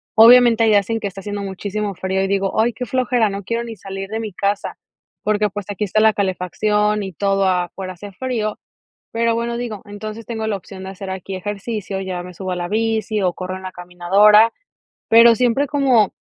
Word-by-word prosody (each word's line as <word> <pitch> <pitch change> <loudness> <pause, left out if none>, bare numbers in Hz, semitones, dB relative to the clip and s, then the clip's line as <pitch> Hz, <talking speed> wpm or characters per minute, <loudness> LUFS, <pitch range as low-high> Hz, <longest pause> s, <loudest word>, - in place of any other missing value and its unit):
Obviamente, 235 0 +7
hay - - +4
días 205 -1 +3
en 225 0 0
que 210 - -3
está 195 0 -8
haciendo 205 +1 -5
muchísimo 200 +1 -4
frío 190 +2 -1
y - - 0
digo: 195 +1 0
"Ay, 230 +2 +2
qué 250 +3 -5
flojera, 245 -2 +1
no 200 0 -5
quiero 230 +4 -2
ni 230 -1 -7
salir 195 0 -7
de 220 +1 -3
mi 215 -3 -5
casa", 200 +2 -2 0.5
porque, 210 0 +1
pues, 205 0 -6
aquí 205 +1 -2
está 215 +2 +1
la 220 0 +6
calefacción 210 +2 0
y 190 -1 -6
todo, 195 +2 +1
afuera 185 +1 -2
hace 200 +3 -10
frío, 215 0 -3 0.5
pero, 230 0 +1
bueno 235 +1 -2
digo, 230 -5 -5
entonces 215 +2 -8
tengo 220 -1 -4
la 210 -2 -1
opción 190 +1 -11
de 190 - -6
hacer 195 0 -8
aquí 190 0 -5
ejercicio, 200 0 -4
ya 185 -2 -4
me 180 0 -10
subo 185 +1 -5
a - - -1
la 175 0 -3
bici 220 0 -1
o 185 -2 +2
corro 185 +1 -5
en 190 - -12
la 185 - -6
caminadora, 195 +5 +4 0.6
pero, 230 +1 +7
siempre 250 +4 +2
como 265 -7 +2
205 Hz, 210 wpm, -20 LUFS, 190-225 Hz, 0.6 s, Obviamente